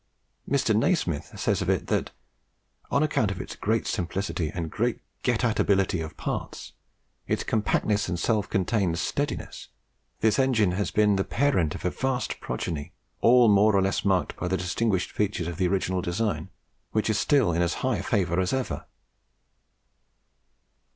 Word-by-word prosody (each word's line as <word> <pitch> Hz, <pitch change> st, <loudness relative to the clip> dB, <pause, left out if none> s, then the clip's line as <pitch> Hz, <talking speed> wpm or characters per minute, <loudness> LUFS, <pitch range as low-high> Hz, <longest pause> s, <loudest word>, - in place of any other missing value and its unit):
Mr. 135 Hz, -6 st, +2 dB
Nasmyth 105 Hz, -, 0 dB
says -, -, +1 dB
of -, -, -1 dB
it, -, -, +1 dB
that -, -, 0 dB, 0.8 s
"on 140 Hz, -, +2 dB
account 115 Hz, -8 st, +1 dB
of 100 Hz, -, -4 dB
its -, -, -6 dB
great -, -, 0 dB
simplicity 90 Hz, -2 st, -2 dB
and 80 Hz, -2 st, -5 dB, 0.5 s
GET 125 Hz, -1 st, 0 dB
AT 115 Hz, -3 st, +1 dB
ABILITY 95 Hz, -3 st, +2 dB
of 80 Hz, -1 st, -7 dB
parts, -, -, -5 dB, 0.5 s
its -, -, 0 dB
compactness 105 Hz, -2 st, 0 dB
and 90 Hz, -, -1 dB
self 105 Hz, +2 st, 0 dB
contained 95 Hz, -3 st, +1 dB
steadiness, -, -, -3 dB, 0.5 s
this 110 Hz, +2 st, +3 dB
engine 120 Hz, -8 st, +3 dB
has 100 Hz, +3 st, -1 dB
been 105 Hz, -2 st, +3 dB
the 95 Hz, -, +1 dB
parent 105 Hz, -, +1 dB
of -, -, -8 dB
a 90 Hz, -, +1 dB
vast 130 Hz, -1 st, -2 dB
progeny, 80 Hz, -1 st, -4 dB, 0.3 s
all 120 Hz, 0 st, +6 dB
more 105 Hz, 0 st, +5 dB
or 100 Hz, -, +4 dB
less 95 Hz, +1 st, 0 dB
marked 95 Hz, -2 st, +1 dB
by 90 Hz, -, -3 dB
the 95 Hz, +1 st, 0 dB
distinguishing 95 Hz, +2 st, -1 dB
features 100 Hz, -5 st, -1 dB
of 85 Hz, -2 st, -5 dB
the 90 Hz, -, +2 dB
original 95 Hz, 0 st, 0 dB
design, 100 Hz, +5 st, -2 dB, 0.4 s
which 110 Hz, -, +1 dB
is 110 Hz, -1 st, +1 dB
still 135 Hz, -, +3 dB
in 85 Hz, -, +1 dB
as 85 Hz, -1 st, +1 dB
high 130 Hz, -2 st, +1 dB
favour 95 Hz, -5 st, 0 dB
as 95 Hz, +4 st, 0 dB
ever." 130 Hz, -1 st, -3 dB
100 Hz, 160 wpm, -26 LUFS, 90-115 Hz, 0.8 s, all